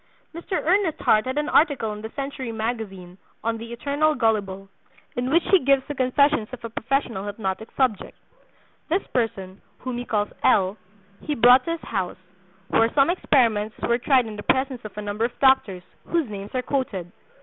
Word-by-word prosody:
Mr. 340 +4 -7
Ernest 360 -2 +1
Hart 215 +3 +3
had 260 +2 -3
an 295 0 0
article 275 -9 +2
in 210 - -8
the 220 - -6
Century 275 -3 -4
Magazine 215 -5 -5 0.2
on 225 0 -1
"The 230 +1 -8
Eternal 285 +5 0
Gullible," 200 -5 0 0.5
in 250 +1 -1
which 335 +5 +3
he 385 - +7
gives 275 0 +3
the 290 - -3
confessions 270 -2 +2
of 255 -2 -9
a 230 - -6
professional 230 -5 -2
hypnotic 205 +1 -4
subject. 255 -7 0 0.7
This 360 +5 +1
person, 195 -6 -2 0.2
whom 250 -1 -5
he 245 - -5
calls 210 -3 0
L., 190 0 +3 0.5
he 300 - -2
brought 245 +2 +6
to 335 - -1
his 335 - -6
house, 190 -5 -3 0.5
where 225 0 +3
some 280 +3 +5
experiments 230 - +2
were 235 +1 +2
tried 255 -1 +3
in 215 -1 -7
the - - -5
presence 260 +1 0
of 210 -1 -10
a 210 - -4
number 205 +2 -1
of 240 - -6
doctors, 265 -9 +3 0.2
whose 335 -5 0
names 200 -1 -7
are 255 - 0
quoted. 215 -11 -3
235 Hz, 180 wpm, -24 LUFS, 210-275 Hz, 0.7 s, he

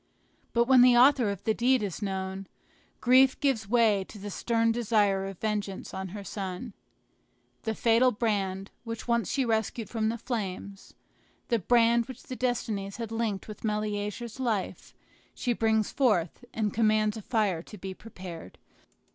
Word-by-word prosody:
But 235 - +4
when 255 0 +6
the 245 -1 +7
author 255 -3 +5
of 200 -2 -5
the 220 - +2
deed 250 +1 +2
is 200 0 -4
known, 190 -1 -4 0.5
grief 260 +1 +5
gives 255 -8 0
way 220 -4 +3
to 215 - -12
the 205 0 -7
stern 230 +2 +1
desire 205 -4 +1
of 195 -2 -7
vengeance 210 -2 -3
on 190 0 -4
her 200 +2 -7
son. 195 +3 -5 0.9
The 220 -1 -1
fatal 230 +3 +4
brand, 200 -4 -1
which 230 -1 -6
once 235 -5 +1
she 270 -2 +1
rescued 220 -1 -1
from 220 -1 0
the 230 - -2
flames, 200 -4 -5 0.5
the 235 - +2
brand 235 +2 +3
which 260 -2 -10
the 255 - -7
destinies 220 -6 -2
had 230 -2 -5
linked 225 -4 -2
with 215 - -9
Meleager's 210 +2 -3
life, 225 -7 -2 0.4
she 245 - 0
brings 220 -2 +1
forth, 220 - +1
and 215 -2 -1
commands 215 -1 +2
a 220 - -6
fire 205 -7 0
to 210 - -12
be 190 0 -6
prepared. 180 - -10
220 Hz, 160 wpm, -28 LUFS, 200-235 Hz, 0.9 s, the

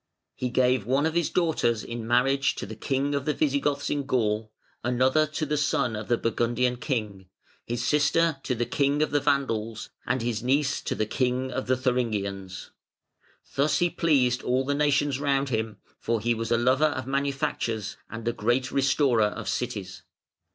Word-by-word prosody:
] - - -57
"He 125 - -2
gave 125 -3 +2
one 135 +4 +2
of 160 - 0
his 170 -2 +1
daughters 155 -10 +1
in 115 -1 -6
marriage 135 +3 +2
to - - -5
the 110 +3 -8
King 135 +5 -1
of 140 -1 -1
the 150 - 0
Visigoths 145 -1 0
in 140 -2 -2
Gaul, 110 -4 0 0.3
another 130 +5 +2
to 155 +1 -3
the 150 0 -1
son 140 -5 +1
of 105 0 -5
the 120 - +2
Burgundian 120 +2 0
King; 105 -8 -3 0.4
his 120 +1 -2
sister 155 +1 +2
to 130 - -2
the 120 +1 -1
King 140 +4 +1
of 155 - -2
the 145 - +3
Vandals, 115 -6 -1 0.2
and 130 -2 0
his 115 -2 -1
niece 140 +3 +1
to - - -3
the 110 - 0
King 125 +3 -1
of 130 - -3
the 130 0 +2
Thuringians. 105 -7 -2 0.8
Thus 145 +2 +2
he 175 -1 +2
pleased 130 -7 +2
all 130 +2 0
the 145 - 0
nations 145 -1 +1
round 140 -1 +1
him, 110 -2 -2 0.2
for 115 0 0
he 120 +3 +1
was 115 0 -3
a 115 - +3
lover 130 +5 +3
of 130 -5 -1
manufactures 135 -6 -2
and 115 0 -7
a 120 - +1
great 120 +4 0
restorer 135 -4 +3
of 105 - -4
cities. 95 -6 -3
130 Hz, 185 wpm, -26 LUFS, 115-140 Hz, 0.8 s, the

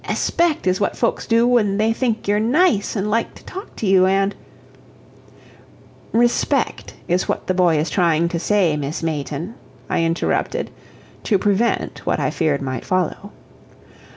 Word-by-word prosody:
Espect 335 - 0
is 185 +2 +1
what 200 - 0
folks 235 - -1
do 230 +1 +3
when 220 -5 +2
they 220 +1 +2
think 230 -3 -2
you're 205 +1 +2
nice, 240 - +2
and 200 0 -1
like 230 +2 -1
to - - -15
talk 385 +2 -9
to - - -4
you, 190 -1 +5
and 195 +1 +1 0.9
" - - -26 0.2
"Respect 240 - -1
is 180 +2 0
what - - -2
the 185 - 0
boy 175 -3 +3
is 150 0 -1
trying 170 -3 +2
to 170 - -2
say, 185 -4 +2
Miss 150 +2 -4
Mayton," 155 +4 -3 0.4
I - - +1
interrupted, 165 +1 -1 0.5
to 205 - +3
prevent 205 +4 0
what - - 0
I - - 0
feared 145 -3 0
might 130 -1 -4
follow. 185 +2 -2
195 Hz, 160 wpm, -20 LUFS, 165-225 Hz, 0.9 s, you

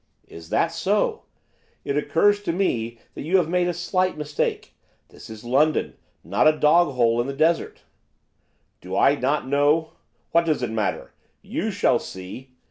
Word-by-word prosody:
'Is 80 -1 -12
that - - +1
so? - - -1 0.6
It 140 - -2
occurs 205 +7 +2
to 205 - -2
me 120 - -1 0.2
that - - -8
you 170 +6 +2
have 175 -4 +1
made 180 +1 +1
a - - +1
slight 185 +1 -1
mistake, 150 -1 -3 0.4
this - - -14
is 110 -1 -10
London, 140 +6 +1 0.3
not - - +2
a 155 0 +4
dog 150 -1 +3
hole 120 -1 +2
in 120 - -4
the 140 - -3
desert.' 160 +3 0 1.0
'Do 95 +1 -5
I 140 - +5
not 140 0 -1
know? 145 +3 +2 0.4
what 170 0 +3
does 155 -5 0
it 120 - -2
matter? 110 -3 -2 0.3
you - - -3
shall - - +2
see! 95 +8 -9
150 Hz, 165 wpm, -23 LUFS, 120-170 Hz, 1.0 s, I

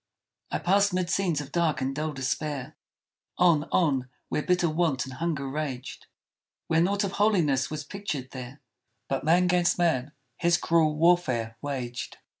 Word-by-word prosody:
I - - -1
passed 200 +1 +2
'mid 180 -1 -1
scenes 175 -7 +1
of 145 -1 -9
dark 170 -2 +1
and 135 +1 -2
dull 155 +1 -2
despair, 140 0 -3 0.6
On, 165 -4 +4
on, 135 -7 +2 0.2
where - - 0
bitter 180 +1 +2
want 155 -5 0
and 130 - -8
hunger 150 -1 -2
raged; 135 -3 -5 0.6
Where 165 0 +2
naught 200 +4 +1
of 195 - -1
holiness 175 -11 +2
was 155 -1 -4
pictured 150 -7 -5
there, 130 +2 -8 0.5
But 135 -1 -2
man 170 +4 +4
'gainst 180 -1 +2
man 150 -5 +1 0.2
his 170 0 +3
cruel 160 -3 +2
warfare 150 -9 +2
waged! 130 -4 -4
155 Hz, 155 wpm, -27 LUFS, 135-175 Hz, 0.6 s, On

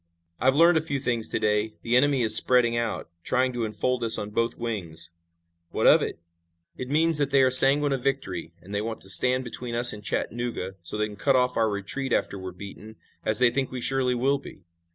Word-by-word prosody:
I've 130 +2 +2
learned 165 +1 +4
a - - -4
few 150 -3 -3
things 120 -4 -2
to - - -2
day. 105 +1 -1
The 120 +1 0
enemy 135 0 +2
is 110 -1 +5
spreading 120 0 +2
out, 115 -6 -4
trying 130 0 0
to 120 -1 -3
enfold 120 +4 -3
us 115 - +5
on 105 0 -6
both 115 +2 -2
wings." 85 -8 -3 0.6
"What - - -2
of - - +6
it?" - - -4 0.6
"It 130 - -7
means 160 +1 +2
that 145 -2 0
they 135 -1 +3
are 130 - +2
sanguine 140 +3 +6
of 135 -2 -3
victory, 140 0 -3
and 100 - -11
they 100 - -1
want 110 +1 -6
to 95 - -5
stand 125 +7 +3
between 120 0 -5
us 120 +1 +6
and 105 0 -11
Chattanooga, 115 -2 -4
so 85 +5 -5
they 105 - 0
can 105 -1 -10
cut 135 +6 +1
off 125 0 +1
our 110 -1 +1
retreat, 105 +7 -4
after 100 - 0
we're 95 0 -7
beaten, 100 +4 -12 0.3
as 110 - 0
they 125 -1 +4
think 135 0 -2
we 130 - -6
surely 130 0 0
will 135 +3 0
be. 95 - -14
120 Hz, 225 wpm, -25 LUFS, 105-130 Hz, 0.6 s, of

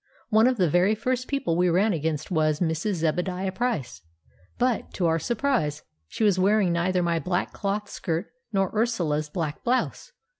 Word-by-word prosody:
One 220 +2 +5
of 255 -1 +1
the 180 -4 +3
very 180 +7 +3
first 250 +3 -2
people 275 -12 -1
we 180 +1 +3
ran 195 +5 +3
against 160 -1 -2
was 155 -3 +2
Mrs. 170 +4 0
Zebadiah 180 +3 -1
Price; 190 - -2 0.6
but, 245 -2 0
to 180 - 0
our 165 0 +2
surprise, 230 - -1 0.2
she 220 - -3
was 200 -3 +3
wearing 200 -1 +3
neither 180 +1 +1
my 170 -1 +1
black 180 +2 -2
cloth 205 +1 -2
skirt 170 +1 -3 0.2
nor 195 -2 +1
Ursula's 170 -10 0
black 150 -2 -4
blouse. 255 - -1
185 Hz, 165 wpm, -26 LUFS, 165-220 Hz, 0.6 s, One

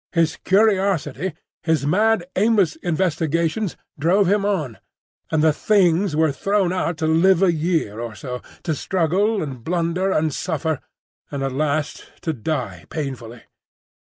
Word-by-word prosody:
His 165 -2 +2
curiosity, 190 - +1 0.3
his 160 -4 +1
mad, 210 +4 +2
aimless 200 -5 +3
investigations, 170 +2 -1 0.2
drove 185 +7 +3
him 200 +2 +2
on; 160 - -1 0.5
and 155 -1 +1
the 160 -1 +5
Things 185 -2 +2
were 160 -1 +3
thrown 195 +5 0
out 175 -3 -1
to 160 - -1
live 170 +4 +4
a 180 -3 +4
year 155 - -1
or 115 -2 -5
so, 125 +5 -6 0.2
to 160 - 0
struggle 190 +6 +1
and 130 -6 -7
blunder 175 +3 0
and 155 -4 +1
suffer, 160 -3 -2 0.5
and 140 -1 -4
at 135 - -1
last 150 +2 -2
to 160 - -1
die 130 0 -4
painfully. 125 -6 -5
165 Hz, 140 wpm, -22 LUFS, 150-190 Hz, 0.5 s, the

